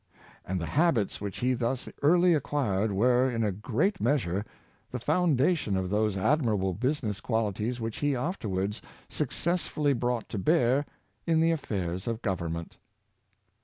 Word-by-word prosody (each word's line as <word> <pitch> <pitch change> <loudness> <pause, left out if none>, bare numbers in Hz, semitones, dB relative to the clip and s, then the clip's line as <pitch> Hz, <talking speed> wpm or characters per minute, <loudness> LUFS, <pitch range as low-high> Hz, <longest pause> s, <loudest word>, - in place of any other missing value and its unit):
And 95 0 -2
the 85 - -3
habits 130 - +1
which 100 -2 -5
he 125 +1 +2
thus 120 +1 -2
early 175 +4 +5
acquired 115 -9 0
were, 125 +6 +3
in 115 -2 -1
a 105 - +1
great 130 - -1
measure, 110 -8 +1 0.5
the 125 - -4
foundation 150 - +2
of 95 0 -2
those 105 -1 +1
admirable 105 -5 +1
business 115 - -1
qualities 110 +1 -1
which 115 -1 -4
he 145 -2 +1
afterwards 105 - -2 0.3
successfully 150 0 0
brought 120 -1 -1
to 105 - -3
bear 140 - +2 0.4
in 165 -1 +3
the 165 +1 +4
affairs 95 - -3
of 115 0 -3
government. 85 -5 -3
120 Hz, 140 wpm, -28 LUFS, 100-145 Hz, 0.5 s, early